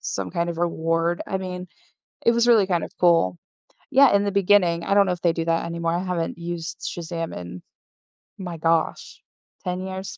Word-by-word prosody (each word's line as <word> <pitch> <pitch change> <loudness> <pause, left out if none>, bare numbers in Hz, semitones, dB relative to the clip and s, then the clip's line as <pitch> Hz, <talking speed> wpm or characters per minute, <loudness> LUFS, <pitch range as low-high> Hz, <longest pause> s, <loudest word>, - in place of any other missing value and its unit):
some 95 -2 -4
kind 170 0 -1
of 165 - -6
reward, 165 0 0
I 190 - -2
mean, 180 -1 -6 0.6
it 235 - +6
was 235 +1 +2
really 220 -5 +5
kind 175 -3 0
of - - -9
cool. 165 - +3 0.5
Yeah, 275 +1 +6
in 200 - +3
the 200 - -1
beginning, 185 -4 +3
I - - 0
don't 200 0 +5
know - - +1
if 175 - -8
they 170 -2 +2
do 165 0 -3
that 165 0 0
anymore, 170 0 -2
I 175 +2 -1
haven't 175 -3 -2
used 170 -1 -6
Shazam 165 -1 -5
in 90 0 -8 0.7
my 180 -3 -6
gosh, 165 0 -1 0.4
10 180 0 -2
years. 190 0 -6
175 Hz, 195 wpm, -23 LUFS, 165-190 Hz, 0.7 s, it